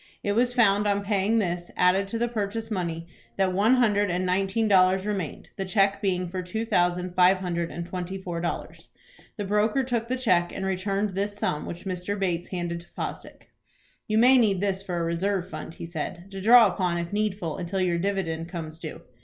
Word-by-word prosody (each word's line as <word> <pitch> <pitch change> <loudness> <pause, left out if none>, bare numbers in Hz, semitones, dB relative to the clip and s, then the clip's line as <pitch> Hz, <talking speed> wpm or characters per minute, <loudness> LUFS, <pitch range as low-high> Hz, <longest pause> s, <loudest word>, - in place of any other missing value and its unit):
It 205 - 0
was 240 +4 +2
found 210 -4 +3
on 200 0 +1
paying 205 +2 +1
this, 175 -4 -1
added 185 +2 +3
to 230 - -3
the 240 +1 +1
purchase 225 0 -3
money, 170 -4 -2 0.3
that 190 -1 +2
one 215 +7 +4
hundred 205 -5 +2
and 180 +1 0
nineteen 195 +4 +1
dollars 190 -1 +4
remained, 195 -7 -4
the 195 - -1
cheque 195 +1 +2
being 185 -3 0
for 185 +1 -4
two 220 +6 -3
thousand 180 -4 +1
five 185 +1 +5
hundred 170 -2 -2
and 170 - -5
twenty 180 +1 -5
four 175 -3 -5
dollars. 170 - -5 0.5
The 205 - -3
broker 210 +6 +2
took 235 -3 -1
the 255 +2 -1
cheque, 180 -9 +2
and 190 - -4
returned 195 +1 -1
this 200 +2 -2
sum, 150 -7 -2
which 175 - -7
Mr. 185 +2 -3
Bates 175 -3 -1
handed 175 -2 -3
to 170 - -17
Fosdick. - - -6 0.6
"You 215 -1 +1
may 250 +3 +7
need 205 -5 +3
this 195 -1 0
for 185 -3 -4
a 170 - 0
reserve 180 +2 -1
fund," 160 - -7
he - - -7
said, 170 +3 -6
"to 195 0 -6
draw 235 +3 +8
upon 180 -3 0
if 170 +2 -4
needful 205 -6 -1
until 185 +2 -3
your 175 -2 +1
dividend 170 -4 -2
comes 160 -3 -6
due. 155 -2 -7
190 Hz, 205 wpm, -26 LUFS, 175-205 Hz, 0.6 s, draw